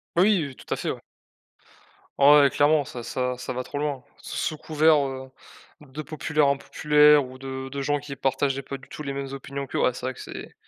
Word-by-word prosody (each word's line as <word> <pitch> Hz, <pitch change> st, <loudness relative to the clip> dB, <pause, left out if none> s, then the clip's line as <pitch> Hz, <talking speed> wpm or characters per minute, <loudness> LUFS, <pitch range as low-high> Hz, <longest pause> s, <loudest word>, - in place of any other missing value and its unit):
Oui, 190 Hz, +1 st, +4 dB
heu, 140 Hz, -3 st, -7 dB
tout -, -, -15 dB
à -, -, 0 dB
fait, -, -, -3 dB
ouais. -, -, -7 dB, 1.2 s
Ouais 145 Hz, 0 st, +7 dB
clairement 145 Hz, +2 st, +3 dB
ça 125 Hz, -2 st, -8 dB
ça 125 Hz, +1 st, -2 dB
ça 125 Hz, 0 st, -5 dB
va 125 Hz, +1 st, -3 dB
trop 145 Hz, -, -7 dB
loin. 145 Hz, -2 st, -2 dB, 0.2 s
S -, -, -21 dB
sous 155 Hz, -, -2 dB
couvert, 155 Hz, 0 st, +3 dB
heu, 130 Hz, 0 st, -7 dB, 0.5 s
de 150 Hz, 0 st, -8 dB
populaires 155 Hz, 0 st, 0 dB
impopulaires 150 Hz, +1 st, +4 dB
ou 130 Hz, +1 st, -11 dB
de 135 Hz, 0 st, -6 dB
de 140 Hz, 0 st, -4 dB
gens 145 Hz, +2 st, +1 dB
qui 145 Hz, -1 st, -7 dB
partageaient 135 Hz, +1 st, 0 dB
pas 140 Hz, +1 st, -7 dB
du 135 Hz, -, -18 dB
tout 150 Hz, -, -8 dB
les 140 Hz, -1 st, -4 dB
mêmes 135 Hz, 0 st, -5 dB
opinions 140 Hz, 0 st, -6 dB
qu'eux, -, -, -3 dB
ouais 125 Hz, -, +2 dB
c'est 125 Hz, -, -7 dB
vrai 130 Hz, -, -2 dB
que -, -, -14 dB
c'est -, -, -9 dB
140 Hz, 220 wpm, -25 LUFS, 130-150 Hz, 1.2 s, Ouais